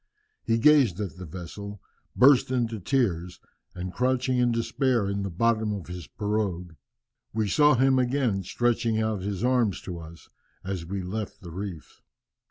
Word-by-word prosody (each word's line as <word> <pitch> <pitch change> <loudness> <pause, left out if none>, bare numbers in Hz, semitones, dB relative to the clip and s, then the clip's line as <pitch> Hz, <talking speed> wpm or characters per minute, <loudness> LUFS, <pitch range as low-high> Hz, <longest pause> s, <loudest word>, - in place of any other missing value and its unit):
He 115 0 +1
gazed 125 - +5
at 100 -4 -4
the 90 -1 -8
vessel, 95 +5 -8 0.4
burst 135 0 +6
into 120 -4 -1
tears, 90 -7 -1 0.4
and 90 0 -5
crouched 130 0 0
in 125 -1 +2
despair 115 -1 +1
in 100 0 -2
the 100 - -3
bottom 110 +4 +1
of 95 - -7
his 90 -1 -8
pirogue. 100 -5 -2 0.6
We 110 -1 0
saw 145 +7 +5
him 130 +1 +4
again, 125 -5 +1
stretching 115 +3 0
out 110 -3 -1
his 100 +2 -3
arms 125 -6 +2
to 90 -2 -6
us, 80 0 -12 0.4
as 95 -3 -4
we 95 +1 -3
left 105 +3 -5
the 85 -3 -9
reefs." 90 -3 -7
105 Hz, 160 wpm, -26 LUFS, 95-120 Hz, 0.6 s, burst